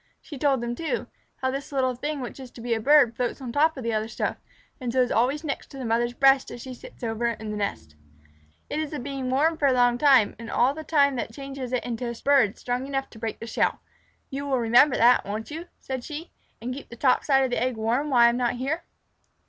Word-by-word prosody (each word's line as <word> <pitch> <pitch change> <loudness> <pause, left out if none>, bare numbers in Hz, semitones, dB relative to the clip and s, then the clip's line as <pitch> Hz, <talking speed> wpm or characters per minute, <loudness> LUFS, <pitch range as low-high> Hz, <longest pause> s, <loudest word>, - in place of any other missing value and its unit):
She 300 - -10
told 275 -3 +2
them, 240 0 -2
too, 330 - -2 0.3
how 260 0 -1
this 275 +2 -5
little 260 -2 +1
thing 290 +3 -4
which 250 - -7
is 260 -2 -9
to 235 - -11
be 235 0 -1
a 225 - 0
bird 270 -1 +5
floats 245 -1 -2
on 255 -3 -6
top 310 +3 +2
of 260 - -5
the 230 0 -1
other 215 0 -1
stuff, - - -3 0.4
and 250 -3 -3
so 260 - 0
is 250 -1 +2
always 265 +7 +1
next 285 -3 -4
to 275 - -12
the 260 - -5
mother's 240 +1 0
breast 270 0 +4
as - - -8
she 260 - -7
sits 245 - -13
over 225 +1 -1
it 235 - -2
on 215 -1 -5
the - - -3
nest. 80 - -4 0.7
"It 300 - -3
is 310 -1 -2
the 300 - -5
being 270 0 -4
warm 310 +5 +2
for 285 - +3
a 265 - +4
long 245 -1 +3
time 265 -7 +5
and 230 0 -8
all 255 +3 +3
the 315 +1 -7
time 280 -4 +3
that 230 - -3
changes 275 -2 -6
it 250 - -1
into 240 0 -3
a 235 - -5
bird 270 -7 +4
strong 250 +2 -3
enough 270 -1 -3
to 220 - -13
break 225 -1 -4
the 230 - -6
shell. 230 - 0 0.5
You 280 +1 -4
will 270 -2 +1
remember 240 +4 +5
that, 240 +2 +5
won't 215 +6 -5
you," 330 +3 -6
said 260 -2 -5
she, 310 +4 -7 0.3
"and 245 +2 -4
keep 275 - -9
the 235 - -9
top 255 +1 +2
side 270 -2 +3
of 260 - -1
the 245 - 0
eggs 250 -1 0
warm 240 +7 0
when 250 -4 +4
I 235 - +8
am 235 - -1
not 245 -1 +1
here?" 295 +8 -3
255 Hz, 260 wpm, -25 LUFS, 235-280 Hz, 0.7 s, I